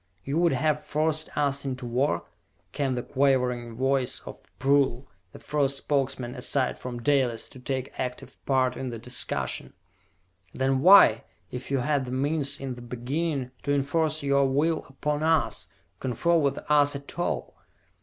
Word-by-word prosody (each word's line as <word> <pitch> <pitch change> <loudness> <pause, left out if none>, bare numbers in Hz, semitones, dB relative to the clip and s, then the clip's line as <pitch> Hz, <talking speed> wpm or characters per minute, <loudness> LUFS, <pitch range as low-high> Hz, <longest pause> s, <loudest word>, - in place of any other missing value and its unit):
"You 140 +4 0
would 170 -3 +3
have 150 +2 +1
forced 155 +1 -1
us 140 -1 +1
into 130 -2 -4
war?" 120 -6 0 0.5
came 135 -3 -1
the 125 - -3
quavering 125 -3 +1
voice 130 +1 +1
of - - -10 0.2
Prull, 135 -2 +2 0.2
the - - -11
first 140 -2 0
Spokesman 130 -4 -1
aside 130 0 -1
from 120 -2 -6
Dalis 130 -5 +2
to 130 - -12
take 130 0 -3
active 125 -1 -5
part 130 -2 +2
in 130 - -4
the 115 - -5
discussion. 125 +3 -2 0.8
"Then 130 0 +1
why, 180 - +7 0.3
if 125 +1 -6
you 135 - +1
had 140 +1 0
the 125 - -6
means 140 +1 0
in 135 -1 -4
the 120 - -10
beginning 130 +3 -3
to 145 - 0
enforce 155 +2 0
your 140 -1 +3
will 155 +5 +1
upon 150 +2 -2
us, 160 0 +1 0.3
confer 130 +7 +1
with 140 -4 +2
us 145 -1 +4
at 140 +4 -8
all?" 175 - -2
135 Hz, 155 wpm, -27 LUFS, 125-145 Hz, 0.8 s, why